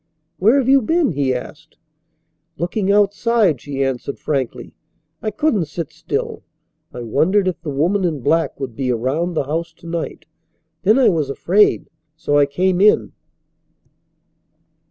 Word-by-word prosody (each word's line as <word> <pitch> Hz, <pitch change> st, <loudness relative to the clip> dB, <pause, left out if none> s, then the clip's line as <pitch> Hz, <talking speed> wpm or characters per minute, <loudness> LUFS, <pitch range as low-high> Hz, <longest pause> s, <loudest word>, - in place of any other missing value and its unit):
"Where 220 Hz, +8 st, +4 dB
have 265 Hz, -3 st, +1 dB
you 270 Hz, 0 st, +5 dB
been?" 325 Hz, +4 st, +1 dB
he 140 Hz, -2 st, 0 dB
asked. 125 Hz, -1 st, -7 dB, 0.8 s
"Looking 190 Hz, +5 st, -1 dB
outside," 205 Hz, -, +2 dB
she 140 Hz, -1 st, -3 dB
answered 135 Hz, +1 st, -3 dB
frankly. 135 Hz, -5 st, -3 dB, 0.5 s
"I 215 Hz, -, -1 dB
couldn't 215 Hz, -, 0 dB
sit 155 Hz, 0 st, -6 dB
still. -, -, -4 dB, 0.5 s
I 125 Hz, -, -7 dB
wondered 185 Hz, -, +2 dB
if 180 Hz, -2 st, -2 dB
the 165 Hz, -, -5 dB
woman 170 Hz, +8 st, +1 dB
in 160 Hz, -6 st, -1 dB
black 160 Hz, +2 st, 0 dB
would 130 Hz, -5 st, -5 dB
be 130 Hz, +1 st, -1 dB
around 140 Hz, +9 st, -1 dB
the 155 Hz, -, +1 dB
house 160 Hz, +5 st, -3 dB
to 170 Hz, -, -19 dB
night. 170 Hz, 0 st, -5 dB, 0.6 s
Then 215 Hz, +5 st, +4 dB
I 265 Hz, -, +5 dB
was 155 Hz, -6 st, 0 dB
afraid, 195 Hz, +9 st, +2 dB, 0.3 s
so 145 Hz, -2 st, +1 dB
I 140 Hz, -, +4 dB
came 180 Hz, +5 st, 0 dB
in." 210 Hz, +1 st, +4 dB
170 Hz, 150 wpm, -19 LUFS, 140-205 Hz, 0.8 s, you